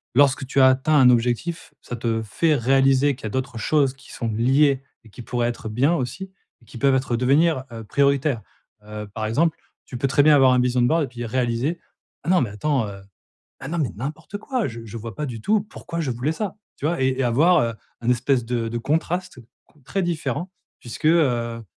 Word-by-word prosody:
lorsque 135 -1 +4
tu 135 - 0
as 130 - +8
atteint 130 +4 +2
un 130 -3 +7
objectif, 125 +8 0
ça 125 - -6
te 115 -1 -1
fait 150 - +1
réaliser 135 +2 +3
qu'il 120 - -11
y - - -1
a - - -4
d'autres 130 +1 -3
choses 140 +2 +2
qui 135 0 -17
sont 115 - -4
liées 135 +5 +2 0.2
et - - -15
qui 115 - -11
pourraient 120 0 -1
être 115 -2 -6
bien 130 +9 +2
aussi 170 +8 -4 0.3
et - - -22
qui 115 - -11
peuvent 140 0 +3
être 130 -2 0
devenir, 140 +3 +2
heu, 115 -1 -7
prioritaires. 140 0 +1 0.4
Heu, 105 0 -7
par 110 -1 -3
exemple, 155 +9 +1 0.3
tu 125 - -7
peux 135 - 0
très 140 +2 +3
bien 150 0 +6
avoir 135 -2 +6
un 125 - +3
vision 125 0 +1
board 160 +7 +3
et - - -10
puis 120 -1 -7
réaliser: 125 +6 -1 0.4
«Ah - - -4
non 180 -2 +4
mais 120 - -1
attends, 125 +2 0
heu. 100 -1 -8 0.6
Ah - - -7
non, 170 +2 -3
mais 145 -7 0
n'importe 150 - -6
quoi! 250 +1 -2
Je 115 -1 -8
je 115 0 -9
vois 115 0 -7
pas 150 - -3
du 120 -4 -6
tout 210 - +2
pourquoi 170 -5 -7
je 150 -5 -2
voulais 125 +6 -1
ça!» 205 +5 -4 0.2
tu 145 - -3
vois? 165 -3 0
Et 130 - +3
et - - +2
avoir, 155 +10 +4
heu, 115 -3 -1 0.3
un 115 - -2
espèce 125 +1 +1
de 115 -1 -2
de 120 +1 -3
contraste, 160 +5 -2
heu, 120 - -14 0.2
con 150 - -27
très 195 +8 -2
différent 175 +1 -2 0.3
puisque, 120 +6 -5
heu, 120 -8 +2
130 Hz, 225 wpm, -23 LUFS, 120-150 Hz, 0.6 s, as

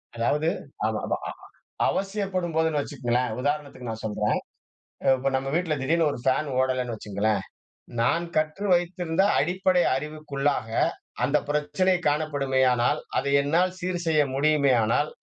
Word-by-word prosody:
அதாவது, 145 +7 +1 0.4
ஆமாமா 110 0 -1
அ - - -3 0.6
அவசியப்படும்போதுன்னு 185 -6 0
வச்சுக்கங்களேன், 125 -4 -1
உதாரணத்துக்கு 140 -3 -3
நான் 110 0 -6
சொல்றேன். 105 0 0 0.7
அ - - -2
இப்ப 135 +1 -1
நம்ம 135 +1 -2
வீட்ல 170 -2 +1
திடீர்னு 160 +3 +2
1 - - -6
ஃபேன் 140 +3 +1
ஓடல்லன்னு 130 -2 0
வெச்சுக்கொங்களேன், 105 0 -1 0.6
நான் 165 +8 +2
கற்று 155 +6 0
வைத்திருந்த 175 0 0 0.2
அடிப்படை 180 +2 +2
அறிவுக்குள்ளாக 145 -4 -2 0.5
அந்த 150 - +3
பிரச்சனை 165 +6 +1
காணப்படுமேயானால், 135 -5 +2 0.2
அத - - 0 0.2
என்னால் 175 +6 +1
சீர் 180 -1 -2
செய்ய 155 -2 +4
முடியுமேயானால், 140 -2 +3
145 Hz, 120 wpm, -26 LUFS, 130-170 Hz, 0.7 s, செய்ய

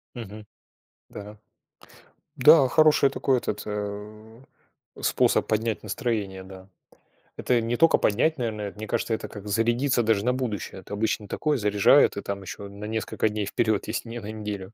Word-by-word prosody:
Мгм. 105 -2 -9 0.6
Да, 105 +1 -10 1.0
да, 145 0 +7
хороший 155 -1 +4
такой 130 -2 +1
этот, 105 -3 -4
э, 105 +2 -7 0.6
способ - - +2
поднять 110 0 -1
настроение, 105 -4 -3
да. 95 0 -13 0.7
Это 120 -2 +1
не 115 +1 -2
только 165 0 +5
поднять, 135 +10 +1
наверное, 110 -4 -3
это, 100 - -17
мне 110 0 -6
кажется, 115 0 -1
это - - -3
как 105 -1 -10
зарядиться 120 +4 +1
даже 110 -1 +1
на 125 - +2
будущее. 110 -6 -4
Это 100 - -10
обычно 105 0 -1
такое 150 -2 -1
заряжает, 105 +4 +4
и - - -2
там 100 0 -5
еще 100 +1 -8
на 100 +1 -9
несколько 110 0 -1
дней 105 -1 -3
вперед, 110 +1 0
если 110 +1 -4
не 120 - -6
на 110 -1 -7
неделю. 105 -2 -6
110 Hz, 165 wpm, -25 LUFS, 105-120 Hz, 1.0 s, да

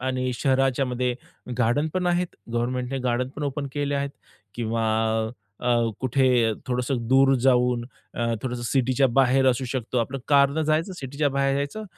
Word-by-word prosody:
आणि 130 0 -1
शहराच्यामध्ये 130 -1 +1 0.4
गार्डन 120 +6 +2
पण 185 -1 0
आहेत. 175 0 -1 0.2
गव्हर्नमेंटने 125 +2 -1
गार्डन 125 +1 0
पण 150 - -5
ओपन 140 0 -3
केले 145 -1 -1
आहेत 140 0 -2 0.5
किंवा 115 -1 -1 0.8
अ, 125 - -5
अ, 120 -1 +3
कुठे 130 +1 +2 0.4
थोडंसं 125 +1 -1
दूर 135 +1 +5
जाऊन, 125 -2 +3 0.3
अ, 120 - -1 0.2
थोडंसं 125 -2 -3
सिटीच्या 130 +2 +2
बाहेर 130 +1 +3
असू 130 +1 -2
शकतो. 125 -1 -2
आपलं 130 +4 -2
कारनं 140 +2 +4
जायचं, 155 +4 0
सिटीच्या 145 -2 -2
बाहेर 135 0 +1
जायचं 145 +10 -3
130 Hz, 150 wpm, -25 LUFS, 125-140 Hz, 0.8 s, दूर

